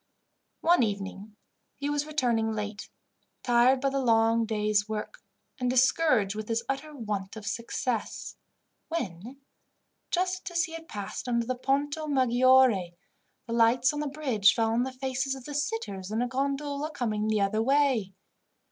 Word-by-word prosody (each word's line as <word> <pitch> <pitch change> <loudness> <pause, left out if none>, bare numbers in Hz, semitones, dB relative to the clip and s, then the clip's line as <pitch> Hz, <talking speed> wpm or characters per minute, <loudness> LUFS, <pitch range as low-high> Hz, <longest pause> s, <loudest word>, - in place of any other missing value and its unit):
One 345 -3 +4
evening 200 -1 -3 0.4
he 280 - -3
was 290 0 -1
returning 235 -7 0
late, 210 -1 -5 0.5
tired 245 +2 +4
by 275 - +1
the 275 - 0
long 225 -1 +3
day's 210 -1 +1
work, 220 - -5 0.4
and 250 -1 0
discouraged 255 -4 +3
with 215 +1 -6
his 230 +1 0
utter 275 +3 -4
want 210 -5 -4
of 220 -1 -8
success, 235 +1 -3 0.5
when, 240 - -5 0.7
just 370 +1 -1
as 340 -1 +1
he 325 - -5
had 330 0 -8
passed 205 +3 -6
under 235 -1 +1
the 255 - -1
Ponto 285 +4 -1
Maggiore, 255 -8 +4 0.5
the 230 - -5
lights 240 +3 +4
on 295 - -3
the 300 - -2
bridge 260 -9 +2
fell 225 -1 +1
on 230 +2 +2
the 260 +1 -2
faces 265 +1 -2
of 265 -2 -11
the 295 - -6
sitters 225 -9 -3
in 220 +1 -1
a - - -1
gondola 280 +3 -2
coming 215 -7 -2
the 215 -1 +1
other 205 +2 +1
way. 260 -7 +2
245 Hz, 155 wpm, -28 LUFS, 215-275 Hz, 0.7 s, One